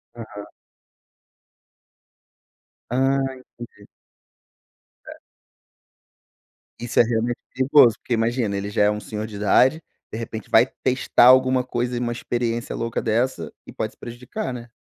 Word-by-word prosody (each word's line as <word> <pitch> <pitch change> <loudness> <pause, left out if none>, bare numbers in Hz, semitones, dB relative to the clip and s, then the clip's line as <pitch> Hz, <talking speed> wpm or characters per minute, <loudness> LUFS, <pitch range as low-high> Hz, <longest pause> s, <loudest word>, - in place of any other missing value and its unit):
Aham. 110 -3 -9 2.4
Ah, 135 +3 +1 0.5
entendi. 100 -2 -20 1.2
É. - - -7 1.7
Isso 120 -1 -1
é - - +8
realmente 120 +1 -1 0.2
perigoso, 130 -3 +5
porque 125 - -4
imagina, 115 -2 0
ele 100 +1 -4
já 105 - +1
é 105 - +4
um 105 - -3
senhor 105 0 -6
de 110 - -10
idade, 120 +9 +3 0.3
de - - -5
repente 110 -2 -7
vai - - +6 0.2
testar 130 -1 +3
alguma 130 0 +5
coisa 125 0 -3
e 120 - -2
uma 120 -1 -2
experiência 120 +1 -3
louca 115 -1 -3
dessa 115 - -1
e - - -11
pode - - -4
se - - -30
prejudicar, 125 - -6
né. 120 -1 -8
120 Hz, 135 wpm, -22 LUFS, 110-125 Hz, 2.4 s, é